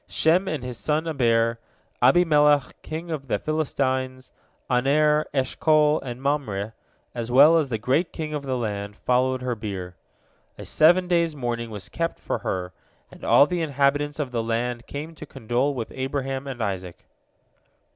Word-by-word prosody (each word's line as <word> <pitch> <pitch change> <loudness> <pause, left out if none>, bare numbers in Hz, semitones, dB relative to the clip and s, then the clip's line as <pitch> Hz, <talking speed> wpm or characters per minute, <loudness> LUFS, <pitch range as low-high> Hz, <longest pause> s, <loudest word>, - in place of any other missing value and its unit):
Shem 175 +4 +2
and 150 -5 -3
his 125 -2 -6
son 155 +2 -1
Eber, 115 -6 +1 0.4
Abimelech 150 0 +4
king 165 +2 -6
of 140 -4 -4
the - - 0
Philistines, 130 -4 -2 0.4
Aner, 150 +4 +2
Eshcol, 150 +3 +2
and 125 -2 -6
Mamre, 125 -7 -2 0.4
as 120 -1 -4
well 145 +6 +7
as 160 -3 +2
all - - -18
the 115 - -1
great 130 +10 0 0.2
of 150 - -2
the 130 -2 -2
land, 105 -3 -4
followed 130 +2 0
her 125 -1 -1
bier. 95 -5 -6 0.6
A - - -8
seven 175 +4 +4
days' 170 -3 +1
mourning 120 -3 -3
was 105 -3 -8
kept 165 0 -3
for - - -3
her, 90 -1 -3 0.4
and - - -15
all - - +6
the 175 +2 -2
inhabitants 145 -1 +1
of 145 -5 -3
the 120 -2 -1
land 120 +1 -2
came 150 +3 -6
to 155 - -10
condole 130 +3 -1
with 115 -3 -5
Abraham 135 0 -3
and 125 -4 -4
Isaac. 95 -4 -5
135 Hz, 160 wpm, -24 LUFS, 120-150 Hz, 0.6 s, well